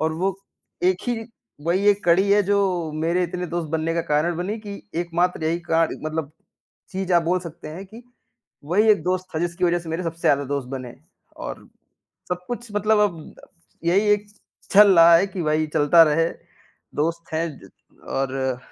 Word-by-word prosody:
और 160 0 0
वो 190 +3 -1 0.5
एक 185 0 +3
ही 225 -2 -2 0.4
वही 185 +4 +1
एक 205 0 +2
कड़ी 185 +4 +4
है 205 +1 +5
जो 200 +2 +2 0.4
मेरे 165 +3 0
इतने 180 +1 -4
दोस्त 170 -1 -3
बनने 160 +1 -1
का 170 - +1
कारण 155 +3 0
बनी 190 +6 -3
कि 205 -2 -7 0.3
एकमात्र 175 0 -1
यही 165 +2 0
काण 165 0 +2 0.2
मतलब 155 -1 -3 0.6
चीज़ 190 -1 -3
आप 170 - +5
बोल 180 +2 +1
सकते 170 -3 -9
हैं 170 +5 -8
कि 225 +5 -13 0.6
वही 200 +8 +2
एक 210 - +3
दोस्त 185 0 -1
था 155 - 0
जिसकी 175 +1 -1
वज़ह 175 0 +2
से 170 - -10
मेरे 165 +3 -2
सबसे 165 0 -5
ज़्यादा 140 0 +3
दोस्त 140 -2 -3
बने। 130 -2 -6 0.4
और - - -7 0.6
सब 180 0 -3
कुछ 240 -1 -6
मतलब 210 +1 +3
अब 170 -7 -1 0.5
यही 195 +5 +2
एक 210 0 0 0.5
चल 200 -1 +8
रहा 165 0 +8
है 190 - +2
कि 195 -1 -6
वही 155 0 +1
चलता 155 +3 +6
रहे, 165 +2 +2 0.7
दोस्त 165 +2 -2
हैं 165 +1 0
ज - - -15 0.4
और 135 -1 -2
170 Hz, 185 wpm, -23 LUFS, 160-190 Hz, 0.7 s, चल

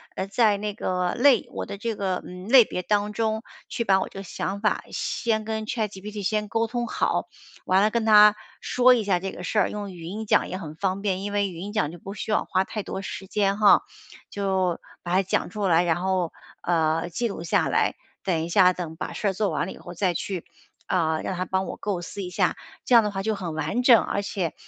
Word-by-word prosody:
呃， 190 - -3
在 210 0 +3
那 205 0 -4
个 180 -2 -1
类 250 -1 +4
我 - - -4
的 200 - -6
这 230 +1 -2
个， 190 -3 -2
嗯， 180 +1 -9
类 255 -1 +9
别 180 - -4
当 210 +2 0
中 220 0 0 0.3
去 235 - -2
把 190 -3 +4
我 - - -2
这 - - -9
个 - - -6
想 195 +1 -4
法 210 - +1
先 220 -2 -1
跟 220 0 -3
ChatGPT 210 -2 -4
先 210 +2 0
沟 225 +2 0
通 240 +1 -2
好， - - -1 0.4
完 185 +1 +4
了 210 - +4
跟 230 0 -1
它 210 -1 +8 0.3
说 255 0 +5
一 235 -3 +1
下 195 -3 +1
这 190 +1 -4
个 - - -9
事 195 - -2
儿， - - +3
用 205 -1 -5
语 175 -2 -10
音 210 +6 -5
讲 - - +3
也 185 - -4
很 155 -4 -8
方 190 +2 -1
便， 195 -2 -1
因 205 0 -4
为 200 -1 +1
语 175 - -9
音 200 +4 -6
讲 155 -8 0
就 175 - -10
不 195 +4 -8
需 210 - -6
要 - - +1
花 185 0 +1
太 210 +2 -5
多 190 - -5
时 195 0 -6
间 200 0 0
哈。 210 -1 +6 0.5
就 190 -3 0 0.2
把 175 - -3
它 190 +1 +4
讲 185 - -1
出 205 +2 -3
来， 170 -1 +4
然 170 -2 +2
后， 185 -3 0 0.3
呃， 165 0 +1
记 235 +7 -1
录 200 - -6
下 170 - +2
来， - - +1 0.3
等 165 -4 0
一 - - -7
下 185 0 +6
等 175 -3 -6
把 - - -5
事 210 - -2
儿 - - -2
做 205 +1 0
完 - - -1
了 190 - -6
以 - - -13
后 175 +1 -9
再 180 0 +1
去， 180 +1 -4 0.4
啊， 160 -3 +1
让 190 - -3
它 180 - -1
帮 190 0 -1
我 - - -5
构 200 -4 -3
思 200 +3 -7
一 180 - -5
下。 180 - +1 0.3
这 - - +1
样 230 - +8
的 210 - 0
话 195 -1 -3
就 220 +1 0
很 175 -5 -5
完 160 +10 -1
整， 245 -3 +7
而 200 - -2
且， 190 -5 -3
195 Hz, 275 characters per minute, -25 LUFS, 180-210 Hz, 0.5 s, 类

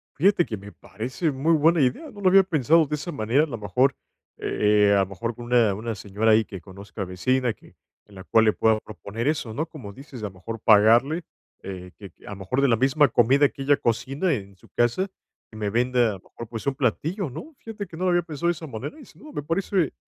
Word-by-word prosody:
Fíjate 175 +3 +3
que 110 - -5
me 100 +1 -11
parece 120 - -4
muy 140 +5 +1
buena 160 +1 +4
idea, 140 - 0
no 205 -3 -12
lo 190 - +4
había 195 +1 +7
pensado 160 -2 +3
de 150 - -2
esa 150 +4 -6
manera. 130 +1 +1
A - - +1
lo 120 -6 -5
mejor, 115 +6 +1 0.4
eh, 105 -1 +2
eh, - - +5
a - - +4
lo 95 - 0
mejor 115 +5 -5
con 120 - -9
una 120 -4 +3
una 110 +3 -4
señora 105 +3 0
ahí, 110 0 +4
que 95 -3 -9
conozca, 100 +2 -8
vecina 120 +7 0
que - - -21 0.3
en 100 - -18
la 95 - -9
cual 110 +3 +3
le 110 - +4
pueda 110 -1 +2
proponer 105 - -6
eso, 145 -7 -1
¿no? 155 +7 -2
Como 125 -11 -10
dices, 135 0 -11
a - - -1
lo 100 - -5
mejor, 95 +5 -8
pagarle, 115 +10 +4 0.4
eh, 90 -1 -8
que, 100 -3 -11
a - - -8
lo 100 - -7
mejor, 100 +8 -1
de 140 - +4
la 115 - +4
misma 135 +5 +3
comida 135 +4 +4
que - - -11
ella 140 +1 +3
cocina, 135 +9 0
en 100 -5 -6
su - - -21
casa, 120 +11 +1 0.4
que - - -14
me 105 -1 -2
venda, 120 +2 +2
a - - -1
lo 95 - -9
mejor, 115 - -11
pues, 115 -2 -6
un 140 - +2
platillo, 155 - -1
¿no? 295 - -9
Fíjate 215 -2 -7
que 170 -3 -12
no 185 - -2
lo - - +3
había 175 0 +2
pensado 165 0 -4
de 175 - +3
esa 160 -1 -9
manera 130 - -7
y, 285 - -12
sin - - -20
duda, 305 - -12
me 145 - -4
parece 170 +1 0
125 Hz, 250 wpm, -24 LUFS, 105-155 Hz, 0.4 s, había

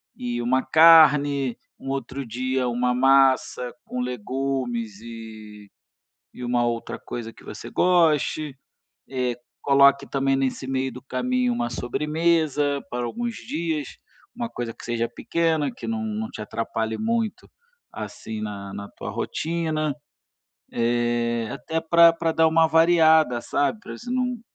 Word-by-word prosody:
e 120 -1 -3
uma 130 +2 +1
carne, 145 -4 +6 0.2
um 135 - -7
outro 135 0 -4
dia 130 +2 -1
uma 125 +1 0
massa 130 -1 +3
com 125 - -5
legumes 125 -2 -3
e 110 -3 -10 0.7
e - - -10
uma 120 0 +1
outra 115 -1 -3
coisa 115 -2 -6
que - - -18
você 110 +2 -8
goste, 155 -2 +2 0.5
eh, 125 -2 -1 0.3
coloque 140 0 +5
também 135 0 0
nesse 135 0 -2
meio 130 0 -1
do 125 +1 -10
caminho 125 -1 0
uma 120 0 -2
sobremesa 150 +2 0
para 120 0 -3
alguns 235 - -3
dias, 160 -2 -4 0.4
uma 235 0 -3
coisa 120 - -5
que - - -15
seja 120 0 -1
pequena, 160 +4 0
que 250 - -8
não 225 0 -2
não 220 0 -3
te - - -8
atrapalhe 110 0 -3
muito 225 -1 -2 0.4
assim 110 -1 -7
na 100 -2 -6
na 100 0 -7
tua - - -8
rotina, 155 -3 -2 0.8
eh, 120 -1 0
até 160 +4 -3
pra 170 +1 +6
pra 165 0 -1
dar 160 0 +4
uma 160 0 +4
variada, 160 -5 +4
sabe, 145 - 0
para - - -9
você 240 - -10
não 250 -2 -1
135 Hz, 140 wpm, -24 LUFS, 120-160 Hz, 0.8 s, carne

